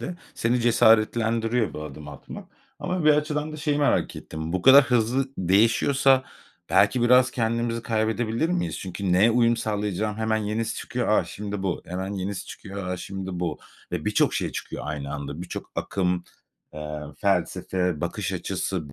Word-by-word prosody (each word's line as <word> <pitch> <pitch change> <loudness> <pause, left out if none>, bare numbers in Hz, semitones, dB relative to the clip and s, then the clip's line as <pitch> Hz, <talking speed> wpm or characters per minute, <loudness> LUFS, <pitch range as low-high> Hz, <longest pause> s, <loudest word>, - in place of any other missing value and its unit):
de 180 - -5 0.2
seni 120 +2 +1
cesaretlendiriyor 115 0 +3
bu 75 - -5
adımı 75 0 -8
atmak. 70 - -10 0.3
Ama 180 -3 -2
bir 155 - +7
açıdan 150 0 0
da - - -6
şeyi 150 -1 0
merak 145 - +1
ettim, 80 +1 -6
bu 95 -1 -1
kadar 135 +1 +9
hızlı 125 +2 +1
değişiyorsa 115 +8 +3 0.5
belki 125 - +4
biraz 125 +1 +5
kendimizi 115 -1 -1
kaybedebilir 110 +5 0
miyiz? 175 -1 -1
Çünkü 95 0 -3
neye 100 +6 +5
uyum 120 0 +3
sağlayacağım? 105 -1 -2
Hemen 110 0 0
yenisi 110 +1 -2
çıkıyor; - - -3
"A! - - +3
Şimdi 105 -1 -6
bu" 95 -3 -2
hemen 95 +3 -4
yenisi 95 -1 -4
çıkıyor; 100 -2 -7
"A! 90 - -2
Şimdi 95 -1 -6
bu" 85 -4 -2 0.3
ve - - -3
birçok - - +2
şey - - -2
çıkıyor - - -6
aynı 70 -2 -4
anda. 70 +3 -6
Birçok 90 - -7
akım, 90 -2 -1 0.5
eee, 75 0 -5 0.2
felsefe, 90 -4 0
bakış - - -3
açısı, 80 -7 -3
110 Hz, 160 wpm, -25 LUFS, 90-120 Hz, 0.5 s, kadar